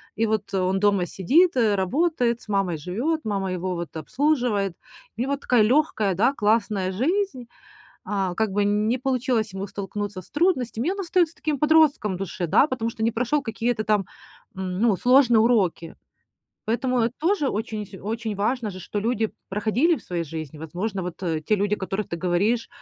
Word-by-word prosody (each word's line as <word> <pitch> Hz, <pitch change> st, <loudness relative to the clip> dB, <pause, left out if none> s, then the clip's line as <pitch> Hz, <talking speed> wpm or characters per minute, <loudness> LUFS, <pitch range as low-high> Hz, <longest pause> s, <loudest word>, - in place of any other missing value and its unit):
И 225 Hz, -, +1 dB
вот 215 Hz, -2 st, -2 dB
он 190 Hz, 0 st, +1 dB
дома 200 Hz, -3 st, +3 dB
сидит, 290 Hz, -, +3 dB
э, 225 Hz, -5 st, +3 dB
работает, 245 Hz, -, +1 dB
с -, -, -15 dB
мамой 195 Hz, -5 st, 0 dB
живет, 235 Hz, -, -2 dB
мама 195 Hz, -3 st, -2 dB
его 185 Hz, 0 st, -2 dB
вот 170 Hz, -3 st, -6 dB
обслуживает. 220 Hz, -, 0 dB, 0.4 s
У -, -, -2 dB
него 275 Hz, +3 st, 0 dB
такая 250 Hz, -4 st, +2 dB
легкая, 220 Hz, -4 st, +2 dB
да, 230 Hz, +9 st, +3 dB
классная 210 Hz, -4 st, +1 dB
жизнь, 270 Hz, -, -1 dB, 0.6 s
а 195 Hz, -3 st, -1 dB
как 220 Hz, 0 st, 0 dB
бы 205 Hz, +1 st, +1 dB
не 210 Hz, +4 st, +1 dB
получилось 250 Hz, -4 st, 0 dB
ему 195 Hz, +1 st, -4 dB
столкнуться 200 Hz, 0 st, -5 dB
с -, -, -20 dB
трудностями, 290 Hz, -5 st, 0 dB
и -, -, +1 dB
он 400 Hz, -, -5 dB
остается 350 Hz, -3 st, +1 dB
таким 305 Hz, -2 st, -2 dB
подростком 300 Hz, -8 st, +3 dB
в -, -, -6 dB
душе, 185 Hz, -1 st, -3 dB
да, 270 Hz, -, +4 dB
потому 245 Hz, -5 st, -2 dB
что 220 Hz, -, -9 dB
не 225 Hz, -, +3 dB
прошел 250 Hz, +6 st, 0 dB
какие-то 225 Hz, -1 st, -2 dB
там, 210 Hz, -2 st, +1 dB, 0.5 s
м, 185 Hz, -1 st, -4 dB
ну, 225 Hz, -2 st, +3 dB
сложные 250 Hz, -1 st, +5 dB
уроки. 205 Hz, -8 st, +1 dB, 0.7 s
Поэтому 240 Hz, +1 st, +1 dB
тоже 335 Hz, -3 st, +1 dB
очень 215 Hz, -1 st, -3 dB
вс 200 Hz, -, -15 dB
очень 220 Hz, +1 st, -3 dB
важно 225 Hz, +3 st, 0 dB
же, 185 Hz, -, -9 dB
что 205 Hz, -, -4 dB
люди 225 Hz, 0 st, 0 dB, 0.2 s
проходили 225 Hz, -, +1 dB
в 240 Hz, -, -11 dB
своей 175 Hz, -2 st, -3 dB
жизни. 155 Hz, -1 st, -7 dB
Возможно, 185 Hz, +6 st, -4 dB
вот 175 Hz, -1 st, -5 dB
те 165 Hz, +2 st, -1 dB
люди, 205 Hz, +1 st, +1 dB
о -, -, -9 dB
которых 195 Hz, +1 st, -3 dB
ты 170 Hz, -, -2 dB
говоришь, 190 Hz, +7 st, +1 dB
215 Hz, 180 wpm, -24 LUFS, 190-250 Hz, 0.7 s, сложные